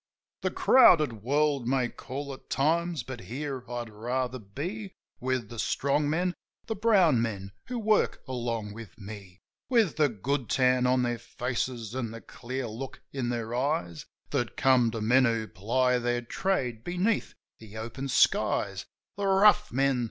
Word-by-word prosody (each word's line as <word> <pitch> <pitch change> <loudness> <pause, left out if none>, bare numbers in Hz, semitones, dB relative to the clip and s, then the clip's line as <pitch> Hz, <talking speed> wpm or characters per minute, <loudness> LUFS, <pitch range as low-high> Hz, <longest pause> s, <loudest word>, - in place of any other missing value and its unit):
The - - 0
crowded 155 - +5
world' 140 +1 +1
may 130 -1 +2
call 140 +3 -6
at 130 - -14
times, 165 0 +1
but 130 0 -7
here 130 +6 -5
I'd 120 -2 -4
rather 125 +4 -2
be. 175 - -6 0.2
With 130 -3 -2
the 120 - -8
strong 145 +5 +1
men, 175 +3 0 0.3
the 225 - -2
brown 190 - +4
men, 100 -4 -3 0.2
who 250 - -3
work 215 -2 +1
along 115 -4 -3
with 110 -3 -11
me; 100 -3 -10 0.3
With 230 - +3
the 150 -2 +4
good 125 +4 -2
tan 125 -1 +3
on 125 0 +3
their 120 -1 -1
faces 120 -1 -3
an' 125 -3 -2
the 115 +1 -8
clear 130 +6 -5
look 120 +4 -7
in 130 -3 -2
their 115 -1 -3
eyes 125 - -1 0.2
That - - -1
come 130 -3 +4
to 115 -1 -4
men 125 +4 +4
who 115 -2 0
ply 125 +7 +1
their 120 0 -1
trade 125 - -1
beneath 180 - -1 0.2
the 110 -1 -11
open 115 +5 -5
skies: 130 - +2 0.3
The 200 -1 -1
rough 210 +2 +5
men. 135 -1 +2
130 Hz, 160 wpm, -28 LUFS, 115-150 Hz, 0.3 s, crowded